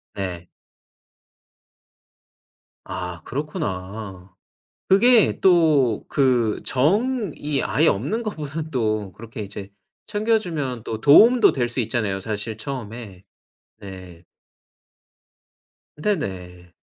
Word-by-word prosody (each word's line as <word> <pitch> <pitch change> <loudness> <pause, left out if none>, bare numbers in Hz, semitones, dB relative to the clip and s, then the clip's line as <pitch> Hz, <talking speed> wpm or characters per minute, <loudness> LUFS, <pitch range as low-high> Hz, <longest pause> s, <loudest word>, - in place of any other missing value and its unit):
네. 90 -3 -5 2.4
아 90 -2 -6
그렇구나. 100 - -5 0.5
그게 230 +3 +5
또 155 - +3
그 125 -6 +1
정이 175 - 0
아예 155 - +2
없는 145 - -1
것보다는 155 -6 -5
또 110 -7 -1
그렇게 115 +4 -10
이제 100 -1 -7 0.4
챙겨 220 +2 +1
주면 145 - -4
또 110 -2 -5
도움도 220 - +7
될 120 -3 -1
수 120 +2 -2
있잖아요, 105 -4 -1
사실 105 +2 -4
처음에. 110 -6 -7 0.6
네. 95 -3 -11 1.7
네네. 90 - -4
120 Hz, 170 characters per minute, -22 LUFS, 100-155 Hz, 2.4 s, 도움도